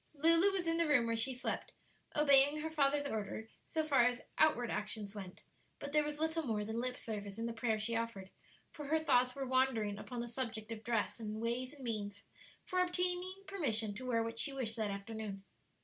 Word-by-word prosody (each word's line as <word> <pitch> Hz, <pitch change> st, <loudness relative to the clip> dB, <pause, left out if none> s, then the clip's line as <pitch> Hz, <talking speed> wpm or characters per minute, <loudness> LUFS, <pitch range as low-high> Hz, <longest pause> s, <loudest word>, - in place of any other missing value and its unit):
Lulu 330 Hz, +6 st, +6 dB
was 380 Hz, -3 st, -1 dB
in 330 Hz, 0 st, +1 dB
the 335 Hz, -1 st, +3 dB
room 285 Hz, -6 st, +4 dB
where 230 Hz, 0 st, 0 dB
she 255 Hz, +3 st, 0 dB
slept, 250 Hz, -, -3 dB, 0.4 s
obeying 290 Hz, 0 st, +5 dB
her 320 Hz, +1 st, -3 dB
father's 285 Hz, -1 st, +2 dB
order 220 Hz, -2 st, -3 dB, 0.2 s
so 315 Hz, -, 0 dB
far 280 Hz, -5 st, +4 dB
as 245 Hz, 0 st, 0 dB
outward 245 Hz, -6 st, +4 dB
actions 210 Hz, -1 st, -2 dB
went; 190 Hz, -3 st, -9 dB, 0.3 s
but 285 Hz, -, -6 dB
there 300 Hz, 0 st, +4 dB
was 295 Hz, 0 st, -3 dB
little 320 Hz, +1 st, +1 dB
more 220 Hz, -7 st, -1 dB
than 220 Hz, +2 st, -2 dB
lip 250 Hz, 0 st, -2 dB
service 205 Hz, -2 st, -5 dB
in 230 Hz, -, -2 dB
the 235 Hz, -, -2 dB
prayer 225 Hz, -1 st, 0 dB
she 230 Hz, +2 st, -1 dB
offered, 225 Hz, -5 st, -3 dB, 0.4 s
for 295 Hz, -2 st, -7 dB
her 315 Hz, +2 st, +3 dB
thoughts 250 Hz, -5 st, +3 dB
were 275 Hz, -1 st, -3 dB
wandering 250 Hz, -6 st, +1 dB
upon 245 Hz, -2 st, -6 dB
the 240 Hz, -, -3 dB
subject 230 Hz, -3 st, -4 dB
of 225 Hz, -1 st, -6 dB
dress, 230 Hz, 0 st, 0 dB
and 215 Hz, -1 st, -4 dB
ways 245 Hz, +4 st, -1 dB
and 275 Hz, -, -12 dB
means 205 Hz, -4 st, -3 dB, 0.4 s
for 365 Hz, -, -1 dB
obtaining 360 Hz, +1 st, 0 dB
permission 230 Hz, -, 0 dB
to 255 Hz, +5 st, -7 dB
wear 230 Hz, -2 st, +2 dB
what 230 Hz, 0 st, -4 dB
she 280 Hz, -, +2 dB
wished 250 Hz, -5 st, -2 dB
that 220 Hz, -3 st, -1 dB
afternoon. 200 Hz, 0 st, -5 dB
245 Hz, 210 wpm, -35 LUFS, 220-295 Hz, 0.4 s, Lulu